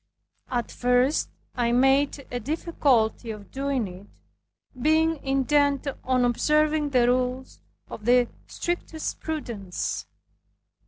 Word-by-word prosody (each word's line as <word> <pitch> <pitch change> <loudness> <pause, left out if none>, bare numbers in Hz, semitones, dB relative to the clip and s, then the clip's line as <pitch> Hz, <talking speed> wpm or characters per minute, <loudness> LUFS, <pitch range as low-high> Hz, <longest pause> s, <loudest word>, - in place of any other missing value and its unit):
At 240 -2 -2
first 250 +4 +2 0.2
I 240 -1 0
made 270 +3 +3
a 245 - -2
difficulty 255 -5 +1
of 210 -2 -8
doing 270 -4 -1
it, 185 +2 -11 0.7
being 315 +1 +2
intent 280 +1 +2 0.2
on 255 -1 +2
observing 300 +4 +2
the 250 -3 +3
rules 255 +1 -1 0.3
of 210 - -9
the 245 0 +5 0.2
strictest 345 -2 -4
prudence. 225 - -4
260 Hz, 105 wpm, -26 LUFS, 240-295 Hz, 0.7 s, the